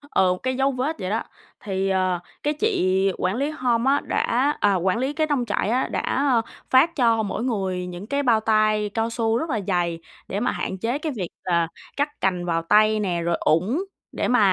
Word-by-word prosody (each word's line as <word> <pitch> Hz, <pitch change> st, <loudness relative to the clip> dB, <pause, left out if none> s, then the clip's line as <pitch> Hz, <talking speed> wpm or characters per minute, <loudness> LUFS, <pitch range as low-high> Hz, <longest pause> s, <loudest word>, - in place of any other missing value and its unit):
Ừ, 185 Hz, -1 st, +4 dB
một -, -, -5 dB
cái 260 Hz, 0 st, 0 dB
dấu 270 Hz, +1 st, +2 dB
vết 270 Hz, +5 st, -2 dB
vậy 185 Hz, -2 st, -3 dB
đó. 220 Hz, +3 st, -1 dB, 0.4 s
Thì, 195 Hz, -3 st, -2 dB
ờ, 185 Hz, -2 st, +1 dB, 0.2 s
cái 295 Hz, -, +1 dB
chị 195 Hz, -, +1 dB
quản 185 Hz, +2 st, 0 dB
lý 280 Hz, +4 st, 0 dB
home 250 Hz, -3 st, +1 dB
á 285 Hz, -, +2 dB
đã 275 Hz, +5 st, +1 dB
à, 205 Hz, -1 st, +3 dB
quản 185 Hz, +2 st, +1 dB
lý 265 Hz, +4 st, -1 dB
cái 310 Hz, +1 st, 0 dB
nông 280 Hz, -5 st, 0 dB
trại 205 Hz, -1 st, -1 dB
á, 255 Hz, +3 st, +1 dB
đã, -, -, -2 dB
a, 265 Hz, -4 st, +1 dB, 0.3 s
phát 305 Hz, +6 st, +4 dB
cho 230 Hz, -4 st, +3 dB
mỗi 215 Hz, +2 st, -3 dB
người 190 Hz, -7 st, -1 dB
những 180 Hz, +3 st, -8 dB
cái 285 Hz, +2 st, 0 dB
bao 235 Hz, -4 st, +4 dB
tay 215 Hz, -1 st, +2 dB
cao 225 Hz, 0 st, 0 dB
su 230 Hz, -1 st, 0 dB
rất 320 Hz, +7 st, -3 dB
là 230 Hz, -6 st, 0 dB
dày 175 Hz, -3 st, 0 dB, 0.3 s
để 200 Hz, -, -2 dB
mà 245 Hz, -, 0 dB
hạn 190 Hz, -, -3 dB
chế 230 Hz, +7 st, -1 dB
cái 305 Hz, +1 st, -3 dB
việc 185 Hz, -6 st, -3 dB, 0.2 s
là 170 Hz, -2 st, +1 dB, 0.3 s
cắt 290 Hz, +1 st, +1 dB
cành 180 Hz, -2 st, 0 dB
vào 165 Hz, -1 st, 0 dB
tay 215 Hz, +5 st, +4 dB
nè, 180 Hz, -5 st, -1 dB
rồi 170 Hz, 0 st, 0 dB
ủng, 190 Hz, -, +1 dB, 0.3 s
để -, -, -2 dB
mà 245 Hz, -, +3 dB
220 Hz, 225 wpm, -23 LUFS, 190-260 Hz, 0.4 s, Ừ